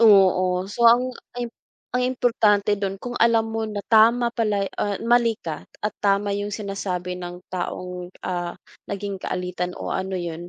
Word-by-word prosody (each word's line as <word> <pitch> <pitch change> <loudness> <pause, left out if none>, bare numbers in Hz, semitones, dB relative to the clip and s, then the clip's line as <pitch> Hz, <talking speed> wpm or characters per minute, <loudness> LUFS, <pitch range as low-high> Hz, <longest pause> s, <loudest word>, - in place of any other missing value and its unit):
Oo, 185 -4 +5
so 230 +4 +4
ang 250 +2 +4 0.2
im 240 -1 -3 0.4
ang 250 - +1
importante 230 -5 +2
dun, 195 -1 -1
kung 245 +5 -6
alam 225 -1 +4
mo 225 0 -2
na 205 -2 -5
tama 235 +2 +5
pala, 210 -4 +1 0.2
ah, 205 -1 0
mali 235 -1 +4
ka 160 -7 -5 0.2
at 210 - 0
tama 200 0 +2
yung 205 +1 -2
sinasabi 195 -3 -3
ng 175 0 -7
taong, 180 0 -4 0.2
ah, 175 -1 -3 0.3
naging 200 -1 -4
kaalitan 180 -1 -3
o - - -4
ano 190 0 -2
yun 175 -1 -5
200 Hz, 160 wpm, -24 LUFS, 180-225 Hz, 0.4 s, Oo